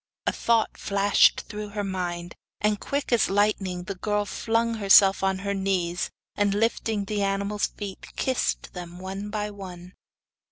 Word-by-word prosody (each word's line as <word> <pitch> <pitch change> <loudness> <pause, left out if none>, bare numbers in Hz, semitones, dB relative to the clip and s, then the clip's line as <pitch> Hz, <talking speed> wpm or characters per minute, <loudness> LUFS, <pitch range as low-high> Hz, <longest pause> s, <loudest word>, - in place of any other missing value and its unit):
A - - +2
thought 230 -2 +1
flashed 200 0 +4
through 210 -1 -7
her 205 0 -3
mind, 175 -3 -3 0.3
and 210 -1 +1
quick 280 -2 -3
as 240 - +3
lightning 195 -3 +1
the 195 - -4
girl 205 +2 -1
flung 230 +3 0
herself 195 -1 +6
on 190 0 +2
her 200 - 0
knees, 185 -3 -1 0.3
and 205 -1 +2
lifting 220 -1 0
the 205 0 -2
animal's 200 +1 0
feet 200 -2 -8
kissed 260 -2 -1
them 175 -1 -8
one 190 +2 -5
by 210 0 -3
one. 185 -2 -9
200 Hz, 155 wpm, -26 LUFS, 190-210 Hz, 0.3 s, herself